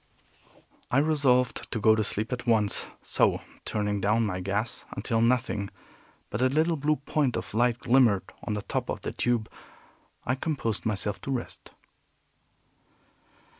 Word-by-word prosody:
I 125 - +2
resolved 140 -4 +2
to 115 - -1
go 110 +1 +5
to 110 0 +1
sleep 110 +4 -2
at 125 0 -5
once; 110 -3 +3 0.2
so, - - +2 0.2
turning 105 -1 -1
down 110 +4 +2
my 95 -3 -2
gas 100 +5 -2
until 115 -2 0
nothing 115 -4 +1 0.6
but 105 - -2
a 130 - +5
little 160 +4 +2
blue 155 +1 +1
point 140 -2 0
of - - -6
light 120 +1 +2
glimmered 120 -7 +3
on 105 - -2
the 105 - -4
top - - -3
of - - -3
the - - -4
tube, 120 -3 0 0.8
I 130 - +1
composed 130 -7 -2
myself 100 -2 -1
to 135 - -4
rest. 125 -3 -5
115 Hz, 150 wpm, -27 LUFS, 105-130 Hz, 0.8 s, go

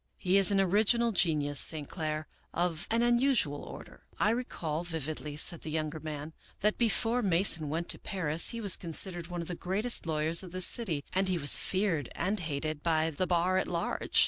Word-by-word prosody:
He 185 +1 +1
is 195 - +4
an 200 -1 +2
original 215 +5 +2
genius, 150 -7 +1
St. 150 -3 +4
Clair, 155 -2 -4 0.3
of 170 -1 -2
an 230 +1 +1
unusual 240 - +1
order." - - -12
" - - -26
I - - +3
recall 170 -10 -4
vividly," 155 -3 -5
said 170 +2 +3
the - - -7
younger 155 0 -3
man, 155 0 -7
" - - -30
that 210 +1 0
before 235 +1 +1
Mason 175 -5 +2
went 165 +3 -3
to - - +2
Paris 165 -4 +1
he 235 - -6
was 200 -4 +5
considered 175 0 +1
one 175 -1 -5
of - - -11
the 180 - -5
greatest 195 +4 -1
lawyers 160 +1 +3
of 180 -2 -11
this 185 -1 +3
city 170 -12 +2
and 190 +1 0
he 185 -1 0
was 145 -3 +6
feared 185 - -1
and 200 +3 -2
hated 155 -1 -4
by 160 -1 0
the 180 +5 -3
bar 180 +2 +1
at - - -3
large. 170 -1 -1
175 Hz, 200 wpm, -29 LUFS, 155-195 Hz, 0.3 s, was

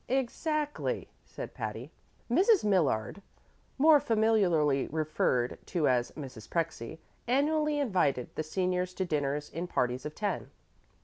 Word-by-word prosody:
"Exactly," 295 +4 -1 0.2
said - - -8
Patty. - - -5 0.4
Mrs. 380 - +4
Millard 180 - +1 0.6
more 300 +2 +7
familiarly 195 - +2
referred 150 -5 0
to 165 -5 +1
as 125 -2 +2
Mrs. 130 -7 -9
Prexy 160 -5 -3 0.3
annually 300 +4 +2
invited 180 - 0
the - - -1
seniors 180 +2 -1
to 190 - -1
dinner 145 -3 0
in 170 +3 -3
parties 125 -5 -1
of 150 - -6
ten. 210 -1 -2
180 Hz, 120 wpm, -30 LUFS, -, 0.6 s, more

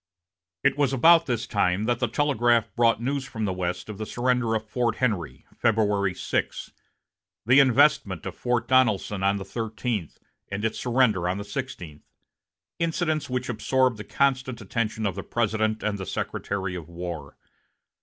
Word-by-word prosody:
It - - +2
was 140 -2 +2
about 165 +5 +6
this 120 -2 -1
time 95 -1 +1
that 120 +2 0
the 125 - +1
telegraph 120 -3 +1
brought 115 -1 +3
news 135 +3 -1
from 110 -3 -4
the 95 - -1
West 90 -1 -3
of 105 -2 -8
the 110 - -4
surrender 125 -2 0
of 110 0 -3
Fort 120 0 0
Henry, 105 - -2
February 105 -5 +1
6, - - -2 0.7
the 125 +5 +6
investment 130 - +3
of 95 -1 -5
Fort 120 -1 -1
Donelson 110 -6 +2
on 100 +1 +2
the 95 - -6
thirteenth, 110 -5 -4 0.3
and 100 +2 -2
its 110 - -2
surrender 115 -8 +2
on 95 - -1
the 100 - -4
sixteenth, 100 - -7 0.7
incidents 160 -3 -1
which 125 0 -2
absorbed 125 +1 +1
the 105 - -6
constant 130 +1 0
attention 110 +1 -2
of 100 - 0
the 95 - -5
President 110 -1 -1
and 105 -1 -1
the 95 - -5
Secretary 95 -2 -3
of 85 -3 -7
War. 85 -4 -7
110 Hz, 165 wpm, -25 LUFS, 100-125 Hz, 0.7 s, about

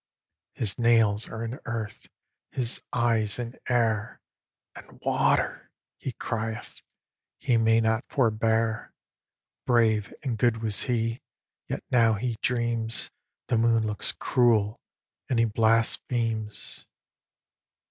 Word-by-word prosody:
] - - -63
His 110 0 -2
nails 115 -3 +3
are 115 0 -5
in 120 +4 -6
earth, 110 -3 -5 0.4
his 125 -3 +2
eyes 115 -3 +2
in 120 0 -6
air, 115 -3 +1 0.6
And - - -13
"Water!" - - +1 0.3
he 130 - -6
crieth 110 -1 -4 0.6
he 130 -4 +1
may 115 0 +4
not 110 +2 +1
forbear. 110 -2 +1 0.7
Brave 110 -4 +3
and 120 -6 -2
good 120 -3 +3
was 110 -2 0
he, 115 0 0 0.5
yet - - -4
now 115 -3 +4
he 120 +3 -2
dreams 115 -2 -1 0.3
The 115 - +1
moon 115 -1 +3
looks 105 -1 0
cruel; 115 -4 +2 0.5
and 125 - +1
he 115 - +4
blasphemes. 115 0 0
115 Hz, 115 wpm, -27 LUFS, 110-120 Hz, 0.7 s, may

